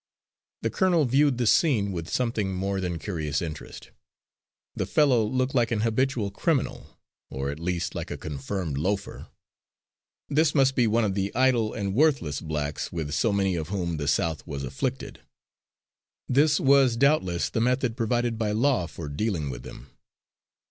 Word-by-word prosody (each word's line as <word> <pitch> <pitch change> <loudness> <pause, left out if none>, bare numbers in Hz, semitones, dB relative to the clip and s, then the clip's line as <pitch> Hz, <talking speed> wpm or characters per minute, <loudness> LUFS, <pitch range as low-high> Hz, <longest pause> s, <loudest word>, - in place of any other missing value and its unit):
The - - 0
colonel 180 -6 +2
viewed 135 +1 +3
the 125 - 0
scene 110 - +3
with 85 -2 -5
something 110 -6 -1
more 95 +1 -2
than 90 -2 -2
curious 80 -6 -2
interest. 80 -3 -7 0.8
The - - -2
fellow 135 -7 +3
looked 130 +4 -1
like 120 -3 +2
an 110 -3 0
habitual 115 -2 0
criminal, 150 - -2 0.3
or 70 +1 -3
at 70 - -8
least 90 0 -2
like - - -5
a - - -5
confirmed 75 +1 -4
loafer. 95 +5 -3 1.0
This 150 +1 +2
must 135 -2 +4
be 120 -3 +2
one 115 +2 +2
of 100 -3 0
the 100 0 -1
idle 125 -4 +2
and 100 -3 -2
worthless 130 - +2
blacks 75 -2 -3
with 80 -4 -4
so 115 - +2
many 100 -2 +1
of 80 -1 -4
whom 90 -4 -2
the 75 -1 -3
South 80 0 0
was 70 -1 -5
afflicted. 65 0 -4 1.1
This 145 +3 +3
was 135 -3 +4
doubtless 115 - +2
the 115 - 0
method 125 -1 +1
provided 120 -1 0
by 105 -2 0
law 120 -5 +2
for 85 -2 -8
dealing 75 -1 -2
with - - -7
them. 65 +1 -12
105 Hz, 160 wpm, -26 LUFS, 85-130 Hz, 1.1 s, must